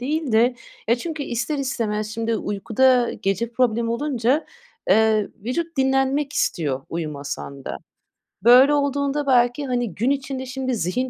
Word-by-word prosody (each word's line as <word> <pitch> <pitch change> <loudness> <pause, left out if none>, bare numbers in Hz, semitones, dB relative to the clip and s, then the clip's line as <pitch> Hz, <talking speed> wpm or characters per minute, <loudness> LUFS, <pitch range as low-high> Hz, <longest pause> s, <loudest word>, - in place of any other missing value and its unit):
değil 295 0 -2
de. 240 +3 +4 0.3
Ya, 235 - +5
çünkü 310 +2 -5
ister 275 +4 -2
istemez 225 -6 -2
şimdi 230 0 -1
uykuda 240 +5 +2
gece 195 +4 -1
problem 235 -2 +1
olunca, 255 +2 0 0.4
eee, 215 0 +3 0.2
vücut 330 +7 -3
dinlenmek 270 +2 +1
istiyor 145 - -1
uyumasan 145 -4 -5
da. - - -4 0.7
Böyle 255 +5 +7
olduğunda 280 0 0
belki, 245 +2 +3
hani, 245 -7 -2
gün 235 +6 0
içinde 270 -1 -2
şimdi 260 0 -3
zihin 230 +7 -1
250 Hz, 135 wpm, -22 LUFS, 220-275 Hz, 0.7 s, Böyle